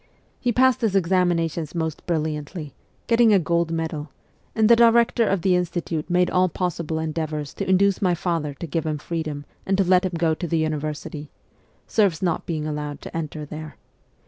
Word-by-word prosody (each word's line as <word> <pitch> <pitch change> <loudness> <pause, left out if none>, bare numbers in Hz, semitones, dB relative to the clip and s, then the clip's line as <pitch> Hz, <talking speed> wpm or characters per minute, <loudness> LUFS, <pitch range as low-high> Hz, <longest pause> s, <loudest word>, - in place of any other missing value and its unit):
He 245 - +1
passed 260 +2 +3
his 215 -4 +1
examinations 175 -3 +1
most 160 0 -3
brilliantly, 155 -2 -3 0.3
getting 230 -1 +4
a 205 - +6
gold 170 -1 +1
medal, 160 -2 -3 0.5
and 220 -2 +4
the 235 - +7
director 235 0 +4
of 190 -3 0
the 185 -2 +4
Institute 170 -2 -2
made 180 0 +3
all 185 0 +3
possible 170 -2 -2
endeavours 155 -2 -3
to - - -4
induce 195 +1 +3
my 180 -3 +2
father 165 -4 -2
to 170 - -6
give 165 +1 -2
him 155 -1 -1
freedom 155 -2 -4 0.2
and 195 0 0
to 195 - +4
let 185 0 +4
him 185 -1 -2
go 165 -1 +2
to 170 +2 -4
the 165 - 0
university 155 -1 -3 0.6
serfs 195 -6 +1
not 170 -3 -1
being 155 -3 -2
allowed 150 -1 -4
to - - -9
enter 155 -2 -4
there. 155 +1 -8
170 Hz, 180 wpm, -23 LUFS, 155-185 Hz, 0.6 s, the